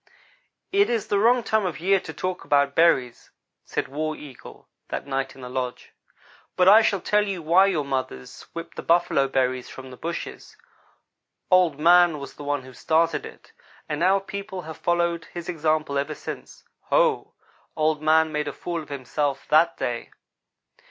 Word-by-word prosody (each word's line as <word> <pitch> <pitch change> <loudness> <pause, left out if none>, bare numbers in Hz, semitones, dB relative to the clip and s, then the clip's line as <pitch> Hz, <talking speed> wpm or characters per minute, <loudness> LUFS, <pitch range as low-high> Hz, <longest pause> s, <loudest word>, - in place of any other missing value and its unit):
"It 400 +1 +3
is 230 -4 -1
the 200 - +2
wrong 240 +3 +4
time 220 -1 +1
of 180 -4 -3
year 195 +3 +3
to 160 - -8
talk 180 +4 -4
about 140 -1 +2
berries," 135 -8 +2 0.3
said - - -3
War 155 +3 -3
Eagle, 140 -5 -13 0.2
that - - -4
night 135 -1 -3
in 135 - -13
the 125 - -7
lodge, 125 -1 -4 0.6
"but 180 - +3
I 210 +3 +9
shall 205 -3 +1
tell 210 +2 +2
you 190 -4 -4
why 180 +5 +5
your 160 -7 0
mothers 130 - -4
whip 165 0 -7
the - - -6
buffalo 165 -5 +2
berries 130 -1 -1
from 130 -1 -10
the 125 - -11
bushes. 170 +1 -6 0.9
Old 180 -5 +4
man 175 0 +5
was 140 -1 -8
the - - -10
one 145 -2 -2
who 130 0 -13
started 165 +4 +1
it, - - -16 0.3
and 150 0 -3
our 190 +2 +4
people 195 -1 -7
have 160 0 -8
followed 170 -1 0
his 175 -1 -8
example 155 -4 0
ever 150 +2 -3
since. - - -9 0.2
Ho! - - +1 0.4
Old 155 -1 +1
man 160 +1 +3
made 150 -1 -2
a 145 - -4
fool 170 -2 -4
of 155 - -13
himself 140 +1 -3
that 165 +2 +4
day. 120 -1 -3
160 Hz, 175 wpm, -24 LUFS, 140-180 Hz, 0.9 s, I